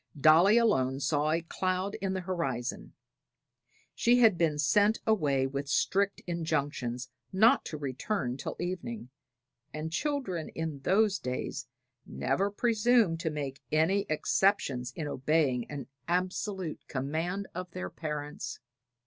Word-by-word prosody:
Dolly 165 - +6
alone 135 - +2
saw 145 +2 +1
a 165 +1 +1
cloud 185 +3 -1
in 195 -1 -1
the 190 - -2
horizon. 135 -10 -3 1.0
She 240 +1 +3
had 225 -5 +6
been 160 -3 +1
sent 205 +8 +3
away 145 -12 +2
with 140 +1 -4
strict 200 +5 +1
injunctions 145 -7 -2 0.2
not 225 +8 +5
to 155 - -5
return 135 - -2
till 135 - -5
evening, 185 - -4 0.6
and 155 +2 -5
children 255 - -2
in 160 -3 -3
those 195 +5 +2
days 125 -1 -4 0.4
never 160 +10 -1
presumed 225 -4 +2
to 165 -2 -1
make 140 -3 -5
any 185 +6 +2
exceptions 155 -6 +1
in 160 -4 -4
obeying 135 -3 +1
an 140 -3 -5 0.2
absolute 180 0 -2
command 160 +8 -2
of 180 +1 -5
their 185 +2 -6
parents. 150 -2 -5
165 Hz, 125 wpm, -30 LUFS, 140-195 Hz, 1.0 s, Dolly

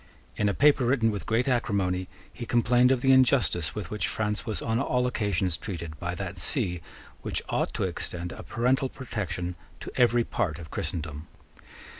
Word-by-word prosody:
In 105 - +1
a 100 - -1
paper 145 -2 +5
written 120 -2 +3
with 100 - -5
great 115 +4 +1
acrimony 100 -7 0 0.3
he 120 - -7
complained 120 +2 +4
of 130 -2 +2
the 135 - +4
injustice 120 - +3
with 100 -5 -5
which 105 - -1
France 105 +1 -2
was 110 - -2
on 115 +1 0
all 125 -2 +1
occasions 100 -8 0
treated 85 -6 -6
by 85 0 -3
that 95 0 -5
See 90 - +1 0.4
which - - -2
ought - - 0
to - - -1
extend 90 0 -3
a - - -8
parental 130 +2 +1
protection 95 -9 -4 0.3
to - - -7
every 120 -1 +4
part 95 -10 -1
of 80 -4 -10
Christendom. 75 -2 -4
105 Hz, 175 wpm, -27 LUFS, 90-125 Hz, 0.4 s, paper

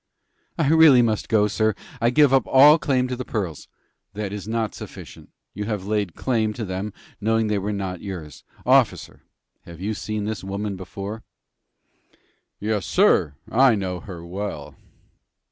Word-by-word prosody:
"I 160 -5 +1
really 155 -6 +7
must 110 -2 -1
go, 105 -2 +3
sir. 110 0 0 0.3
I 115 - +4
give 145 +1 +4
up 135 -4 +3
all 145 +4 +7
claim 130 -4 +1
to 125 - -3
the 130 - -5
pearls." 95 - -4 0.5
"That 105 -1 -4
is 105 -1 -6
not 110 -1 -1
sufficient. - - -11 0.2
You 105 +1 -4
have 105 -3 -3
laid 105 -4 -1
claim 110 -4 0
to 110 0 -5
them, 95 +2 -4 0.3
knowing 115 +1 +2
that - - 0
they 100 - +1
were 100 +2 -3
not 95 -3 -4
yours. 85 -7 -8 0.2
Officer, - - +2 0.4
have 85 -1 -11
you 100 +4 -2
ever - - -3
seen 110 -1 -3
this 110 -1 -4
woman 100 +1 -4
before?" 100 +3 -7 1.4
"Yes, 105 -2 -2
sir, 70 - +3 0.2
I 130 0 +5
know 95 -3 -3
her 85 -3 -9
well." 90 -5 -6
105 Hz, 165 wpm, -23 LUFS, 95-115 Hz, 1.4 s, really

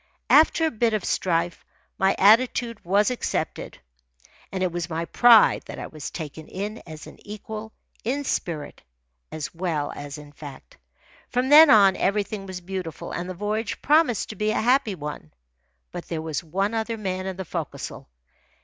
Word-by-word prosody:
After 320 +2 +5
a 320 - 0
bit 225 0 +1
of 210 - -3
strife, 170 -1 -1 0.4
my 190 0 +3
attitude 230 +2 +3
was 200 +6 +2
accepted, 250 - -3 0.7
and 190 -1 -2
it 185 - 0
was 175 0 -4
my 165 0 -2
pride 235 +3 +6
that - - -8
I - - -5
was 155 -3 -7
taken 155 -1 -8
in 205 +4 -5
as 155 -2 -9
an - - -13
equal 215 +1 -8 0.3
in 270 +5 -1
spirit 165 - -3 0.5
as 155 -1 -5
well 165 -4 -2
as 145 0 -7
in 150 -1 -12
fact. 145 -2 -12 0.5
From 250 +2 0
then 305 +1 +9
on, 200 -5 +7
everything 200 0 -1
was 185 -1 -6
beautiful, 180 -3 -6
and 175 +1 -4
the 185 - -5
voyage 210 +4 -3
promised 295 - +3
to 215 - -7
be 210 0 -1
a - - +1
happy 245 -3 +2
one. 150 - -7 0.6
But - - -7
there 160 -1 -4
was 160 -1 -3
one 195 +6 -1
other 225 0 -2
man 185 -2 -3
in 190 -1 -5
the 190 - -5
forecastle. 150 - -6
195 Hz, 170 wpm, -24 LUFS, 170-225 Hz, 0.7 s, then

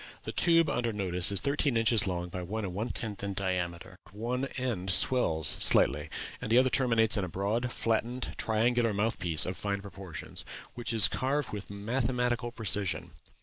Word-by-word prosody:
The - - -5
tube 165 -2 +3
under 120 -1 -1
notice 90 -3 0
is 100 - +3
thirteen 140 -3 +1
inches 115 -2 +3
long 90 -1 -3
by 90 +1 -5
one 105 +4 -4
and 90 - -5
one 110 +6 -3
tenth 105 -4 -4
in 100 -1 -3
diameter; 90 -1 -3
one 120 +6 -3
end 115 -8 -3
swells 90 - +1
slightly, 75 +3 +4 0.3
and 110 - -4
the 115 - +5
other 130 0 +4
terminates 115 -4 +2
in 100 - 0
a - - -2
broad, 105 +7 -2
flattened, 120 +3 -2
triangular 115 0 +1
mouth 110 +3 -1
piece 85 -3 +3
of 90 - -3
fine 100 +2 -2
proportions, 95 -4 -8 0.3
which 120 -1 -3
is 110 -4 +8
carved 135 +2 -1
with 105 -1 -6
mathematical 120 +3 -1
precision. 100 -7 -1
110 Hz, 175 wpm, -30 LUFS, 95-120 Hz, 0.3 s, is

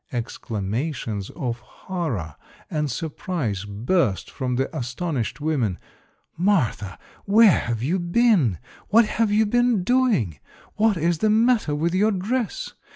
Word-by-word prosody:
Exclamations 115 -1 -3
of 120 -3 -3
horror 125 - -5 0.4
and 150 -2 -1
surprise 135 - -3
burst 110 - 0
from 125 -2 -2
the 135 +2 -2
astonished 125 +1 -3
women. 135 - 0 0.6
"Martha, 160 - 0 0.3
where 210 0 +6
have 115 -1 -3
you 170 +8 0
been? 175 - +3 0.3
What 230 +3 +5
have 215 0 0
you 215 +1 +4
been 240 -2 +2
doing? 210 - +1 0.3
What 215 -2 +2
is 165 0 0
the 215 - +2
matter 220 -7 +3
with 165 +3 0
your 205 +4 +3
dress? 225 - -2
160 Hz, 125 wpm, -23 LUFS, -, 0.6 s, where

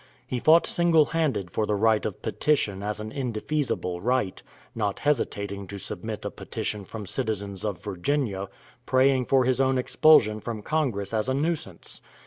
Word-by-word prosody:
He 125 -1 -3
fought 160 +6 +6
single 170 -3 +4
handed 140 - -1
for 105 +4 -1
the 105 - +1
right 110 +1 +3
of 105 - -8
petition 105 -10 0
as 105 +1 -3
an 110 0 -6
indefeasible 125 -7 -2
right, 120 -3 0 0.3
not 105 -3 -1
hesitating 100 -8 -1
to 100 - -7
submit 95 - -6
a - - -2
petition 105 -2 -5
from 105 +1 -7
citizens 100 -4 -3
of 100 -5 -3
Virginia 100 0 -1 0.4
praying 130 0 +3
for 135 0 +4
his 130 0 +2
own 130 0 +2
expulsion 125 -4 +5
from 110 -1 -5
Congress 115 -10 -1
as 110 +3 0
a 130 - +1
nuisance. 145 - -3
110 Hz, 160 wpm, -26 LUFS, 100-135 Hz, 0.4 s, fought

